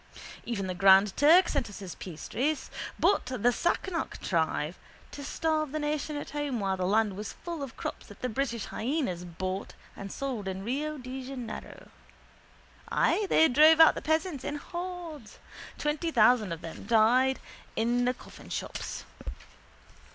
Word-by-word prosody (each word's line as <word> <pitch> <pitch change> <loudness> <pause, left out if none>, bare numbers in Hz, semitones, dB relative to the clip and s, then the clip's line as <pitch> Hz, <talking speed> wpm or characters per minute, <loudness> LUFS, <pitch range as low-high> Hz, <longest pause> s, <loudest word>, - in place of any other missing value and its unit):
Even 215 -5 -2
the 185 - -2
Grand 195 +2 +6
Turk 335 +5 +6
sent 270 -6 -1
us 205 - -9
his 190 -4 -7
piastres. 260 - -3 0.3
But 400 - +3
the 245 -2 +2
Sassenach 345 +5 -1
tried 160 -2 0 0.4
to 285 - -7
starve 310 0 -1
the 310 - -2
nation 300 0 -2
at 290 - -6
home 290 -5 -2
while 195 -1 0
the 185 -1 -1
land 210 0 +2
was 210 +1 -6
full 340 -3 -6
of 275 -4 -7
crops - - -5
that 205 - -14
the - - +1
British 240 -2 -2
hyenas 240 - -2
bought 185 +3 -4 0.2
and 195 0 -7
sold 255 -8 -4
in 190 0 -4
Rio 295 +7 -2
de 260 0 -6
Janeiro. 250 -4 -7 1.0
Ay, 420 - +2
they 320 - +6
drove 310 +4 +6
out 320 - +9
the - - -5
peasants 315 -2 0
in 290 - -3
hordes. 345 -5 -7 0.4
Twenty 300 +3 -1
thousand 225 - +4
of 165 0 -5
them 165 +2 -8
died 245 +4 +4 0.4
in 240 +2 +1
the 250 +1 +1
coffinships. - - -6
250 Hz, 155 wpm, -29 LUFS, 205-300 Hz, 1.0 s, out